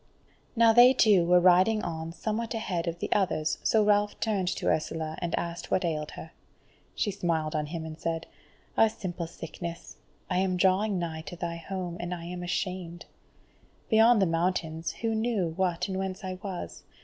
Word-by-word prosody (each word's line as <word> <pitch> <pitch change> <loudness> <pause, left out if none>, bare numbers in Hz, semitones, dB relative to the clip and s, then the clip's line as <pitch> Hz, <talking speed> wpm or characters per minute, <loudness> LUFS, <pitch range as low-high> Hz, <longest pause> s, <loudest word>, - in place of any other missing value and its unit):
Now 230 -1 +6
they 245 +2 +8
two 205 -9 +4
were 180 0 +6
riding 185 +5 +4
on 160 -1 -4
somewhat 220 +5 -3
ahead 185 -7 -2
of 170 0 -2
the - - -5
others, 155 -6 +1
so 220 -1 +3
Ralph 205 0 +2
turned 205 -5 0
to 185 - -2
Ursula, 160 0 -1
and 175 -1 -1
asked 170 0 -4
what 185 - +1
ailed 150 -2 -2
her. 160 - -9 0.6
She 205 - 0
smiled 165 -5 -1
on 150 -1 -1
him 160 +1 -5
and 160 0 -8
said: 165 0 -2 0.5
"A 225 - +5
simple 180 -5 -5
sickness. 170 +1 -8 0.3
I 180 -1 0
am 185 -1 +1
drawing 190 +2 +2
nigh 165 -2 -3
to 180 - -6
thy 170 -1 -4
home, 175 0 -5
and 175 +1 -3
I 170 -1 -8
am 180 +1 -6
ashamed. 175 -1 -3 0.9
Beyond 225 +1 +6
the 195 - +4
mountains, 165 -1 -1
who 225 -1 -2
knew 220 -5 0
what 180 -1 0
and 190 -1 -3
whence 190 +1 -4
I 185 -1 -5
was? 175 - -6
180 Hz, 180 wpm, -28 LUFS, 165-205 Hz, 0.9 s, they